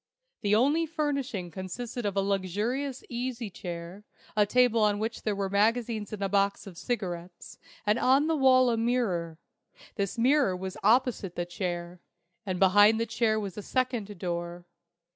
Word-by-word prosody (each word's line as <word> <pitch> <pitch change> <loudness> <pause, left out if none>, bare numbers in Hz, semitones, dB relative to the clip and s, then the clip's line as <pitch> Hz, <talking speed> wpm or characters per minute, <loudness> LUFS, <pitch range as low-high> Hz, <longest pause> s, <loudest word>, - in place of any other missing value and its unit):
The 205 -1 +2
only 290 +8 +3
furnishing 280 - -2
consisted 215 +6 -5
of 200 - -3
a - - +4
luxurious 210 +8 -2
easy 240 -3 -4
chair, 175 +2 -7 0.3
a 210 -1 +3
table 245 -1 +3
on 210 -1 +3
which 220 +2 -3
were 200 -2 -1
magazines 215 +1 0
and 205 -2 -4
a - - +1
box 200 0 +1
of 195 -3 -10
cigarettes, 175 -5 -5 0.3
and 210 +3 +2
on 270 +3 +4
the 320 0 +1
wall 255 -3 +5
a 230 - 0
mirror. 215 -9 0 0.6
This 200 +2 -2
mirror 260 -4 +3
was 190 +1 -6
opposite 220 -4 +2
the 175 - -2
chair; 175 -1 -4 0.5
and 185 -1 -1
behind 205 +4 +5
the 230 - +1
chair 220 -1 +1
was 200 -1 -5
a - - -5
second 240 -4 -2
door. 175 0 -4
210 Hz, 160 wpm, -28 LUFS, 185-245 Hz, 0.6 s, wall